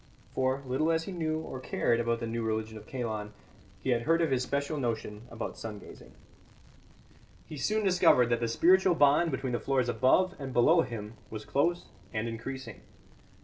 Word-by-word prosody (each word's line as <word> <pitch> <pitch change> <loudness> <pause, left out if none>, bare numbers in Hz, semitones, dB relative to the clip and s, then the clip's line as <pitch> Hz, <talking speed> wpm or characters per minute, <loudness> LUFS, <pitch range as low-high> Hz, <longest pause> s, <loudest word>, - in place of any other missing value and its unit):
For, 130 +1 0
little 135 +6 +1
as 165 0 +1
he 195 - -6
knew 160 -3 -2
or 135 -5 -7
cared 120 -2 0
about 115 0 0
the - - -2
new 115 +1 -3
religion 110 0 -2
of 110 0 -11
Kalon, 110 -5 -4 0.5
he 130 - +1
had 120 -1 +2
heard 165 +6 +2
of 160 - 0
his 130 -2 +2
special 140 +3 -2
notion 115 -2 -3
about 115 -1 -6
sun 110 -2 -6
gazing. - - -13 1.3
He 155 - -8
soon 215 +10 0
discovered 175 -10 +5
that 120 -1 +1
the 120 - 0
spiritual 180 +9 +4
bond 145 +3 +4
between 130 -5 -3
the 120 - 0
floors 130 -3 0
above 185 +10 +3
and 135 -2 -5
below 160 +8 +5
him 115 -4 -6
was 110 -1 -7
close 170 +9 0 0.3
and 110 +1 -2
increasing. 130 +4 -6
130 Hz, 185 wpm, -30 LUFS, 115-155 Hz, 1.3 s, discovered